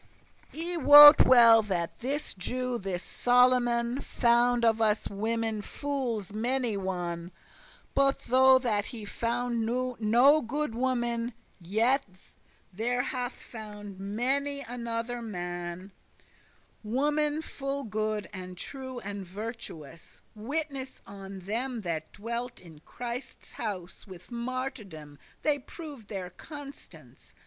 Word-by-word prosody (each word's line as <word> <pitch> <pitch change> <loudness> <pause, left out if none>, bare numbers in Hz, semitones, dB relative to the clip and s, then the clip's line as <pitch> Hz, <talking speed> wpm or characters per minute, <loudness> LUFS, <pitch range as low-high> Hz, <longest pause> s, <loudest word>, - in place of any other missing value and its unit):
I 340 +2 -3
wot 295 0 +10
well 230 -3 +8
that 180 -5 -3
this 280 +5 -2
Jew, 250 +6 -3
this 185 -2 -4
Solomon, 245 0 +2
Found 240 0 +2
of 225 0 +3
us 215 -1 +2
women 220 +1 -1
fooles 240 -7 -3
many 240 +1 0
one: 175 -3 -4 0.6
But 275 0 +3
though 260 +1 +6
that 220 -6 0
he 225 -4 -7
founde 235 +2 -2
no 245 +4 +3
good 285 +2 -2
woman, 240 -1 -1 0.2
Yet 225 +10 +2 0.7
there 245 +5 0
hath 250 -1 -3
found 210 -3 -10
many 265 +8 0
another 235 -1 -4
man 175 -2 -6 0.9
Women 295 +6 +1
full 275 -1 -4
good, 215 -1 -2
and 185 -1 -8
true, 260 +5 -7
and 200 0 -6
virtuous; 185 - -9
Witness 270 +3 -4
on 195 -1 -9
them 230 +5 -3
that 165 -4 -4
dwelt 235 +3 -5
in 165 -4 -15
Christes 245 - -7
house; 195 -4 -6
With 185 +3 -13
martyrdom 235 - -5 0.2
they 295 -2 +2
proved 280 - -10
their 190 -3 -6
constance. 290 - -12
235 Hz, 110 wpm, -29 LUFS, 200-255 Hz, 0.9 s, wot